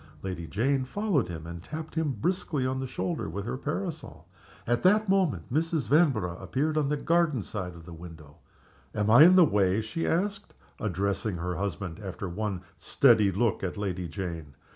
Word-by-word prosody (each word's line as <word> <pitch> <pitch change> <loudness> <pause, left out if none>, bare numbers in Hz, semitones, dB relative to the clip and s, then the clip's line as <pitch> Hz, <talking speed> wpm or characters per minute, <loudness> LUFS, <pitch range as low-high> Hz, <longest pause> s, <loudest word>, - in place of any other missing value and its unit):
Lady 90 -3 -4
Jane 130 - +1
followed 185 - 0
him, 80 -2 -6
and 85 0 -7
tapped 155 - -7
him 160 -4 0
briskly 145 - -1
on 130 0 -1
the 130 - -3
shoulder 160 - -3
with 100 +4 -5
her 120 - -3
parasol. 155 +3 -5 0.4
At 120 0 +1
that 210 +3 +4
moment 175 - +1
Mrs. 160 -4 0
Vanborough 120 - +2
appeared 150 +4 -1
on 150 -3 +1
the 150 - 0
garden 165 -7 +1
side 90 -5 -5
of 85 -1 -12
the 85 - -10
window. 80 -3 -12 0.6
"Am 105 +1 +1
I 130 +7 +9
in 180 +2 +7
the 180 -2 +8
way?" 100 -5 +2
she 110 +10 -3
asked, 200 +4 -1 0.2
addressing 100 0 -1
her 90 +2 -3
husband, 100 -2 -4
after 95 -1 -6
one 95 0 -3
steady 110 -7 +4
look 105 +2 0
at 95 0 -3
Lady 90 -3 -3
Jane. 80 -4 -6
110 Hz, 180 wpm, -28 LUFS, -, 0.6 s, I